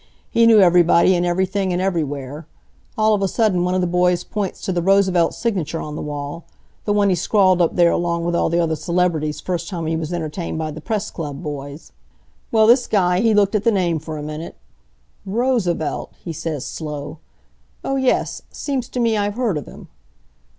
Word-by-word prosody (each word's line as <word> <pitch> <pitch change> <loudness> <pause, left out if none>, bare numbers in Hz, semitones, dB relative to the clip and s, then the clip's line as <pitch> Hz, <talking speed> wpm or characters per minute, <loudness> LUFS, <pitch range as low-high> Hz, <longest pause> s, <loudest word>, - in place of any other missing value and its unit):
He 230 -1 +4
knew 225 -2 +7
everybody, 175 0 +5
an' 175 0 +1
everything, 190 +2 0
an' 175 - 0
everywhere. 150 -5 -3 0.5
All 215 0 +3
of 205 - +1
a 195 - +2
sudden 190 -3 +1
one 180 +1 0
of 185 - +1
the - - +1
boys 180 0 +1
points 200 -1 -4
to - - -2
the 175 -1 0
Roosevelt 190 -2 +3
signature 175 -8 -2
on 150 -1 -6
the - - -5
wall 145 +2 -6 0.4
the 205 - 0
one 205 -1 +3
he - - +3
scrawled 185 +1 +3
up 170 - +1
there 175 -1 +5
along 170 -1 -1
with 175 - -1
all - - +1
the 170 +1 +1
other 165 -2 +1
celebrities 155 -1 -1
first 170 +1 -3
time 170 -3 -4
he 160 +1 -1
was 160 0 -4
entertained 165 0 -4
by 155 -1 -3
the 155 +1 -8
Press 215 +2 -3
Club 150 -1 -6
boys. 145 0 -7 0.6
Well 220 -1 +5
this 240 +2 +5
guy, 180 -3 +2
he 220 0 +3
looked 205 0 +3
at 210 -1 +1
the 230 - +4
name 175 -5 +1
for 155 0 -7
a 150 - -6
minute. 155 +2 -6 0.7
'Roosevelt?' 205 - -1
he 170 - -4
says, 155 -3 -4
slow. 150 -1 -6 0.6
'Oh, 270 - -1
yes. 265 -1 0
Seems 270 -4 -4
t' 250 - -4
me 230 -2 +2
I've 205 0 -1
heard 235 -7 0
of 150 - -5
him.' - - -12
175 Hz, 200 wpm, -20 LUFS, 160-200 Hz, 0.7 s, knew